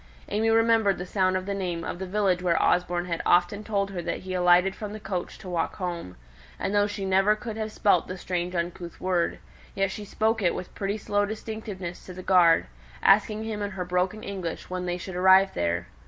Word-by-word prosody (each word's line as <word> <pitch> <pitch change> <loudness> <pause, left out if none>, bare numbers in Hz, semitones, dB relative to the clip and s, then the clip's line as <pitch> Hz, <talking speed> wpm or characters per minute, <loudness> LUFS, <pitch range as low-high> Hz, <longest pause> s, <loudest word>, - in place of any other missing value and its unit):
AimÄe 220 +2 +1
remembered 225 -3 +3
the 180 - -5
sound 185 0 +1
of 185 - -5
the 200 - -2
name 180 -4 -3
of 175 - -5
the 190 - -4
village 190 -2 +1
where 170 -2 +2
Osborne 175 0 +1
had 170 -2 -2
often 180 +4 +3
told 200 -2 -1
her 180 -3 -4
that - - -3
he 185 0 -6
alighted 180 +1 +4
from 210 -1 -6
the 215 - -6
coach 195 -3 -4
to - - -12
walk 170 -2 -1
home; 170 - -5 0.4
and 195 - -2
though 205 0 +3
she 205 -1 -5
could 190 - -2
never 195 +3 +4
have 220 -1 -5
spelt 205 - +2
the 185 - -5
strange 180 0 -3
uncouth 170 0 -4
word, 180 -2 0 0.4
yet 195 -1 +1
she 210 - -6
spoke 220 +2 0
it 175 -3 +2
with 180 - -7
pretty 200 +1 -2
slow 205 -1 0
distinctness 205 -4 -6
to 185 - -9
the 185 - -8
guard, 175 -3 +5 0.4
asking 215 +2 +4
him 220 -2 -4
in 205 - -1
her 190 -2 -5
broken 180 +4 -1
English 185 -4 -5
when 180 0 -3
they 175 0 -1
should 180 +1 -7
arrive 190 +1 +5
there? 85 0 -1
190 Hz, 215 wpm, -26 LUFS, 180-205 Hz, 0.4 s, guard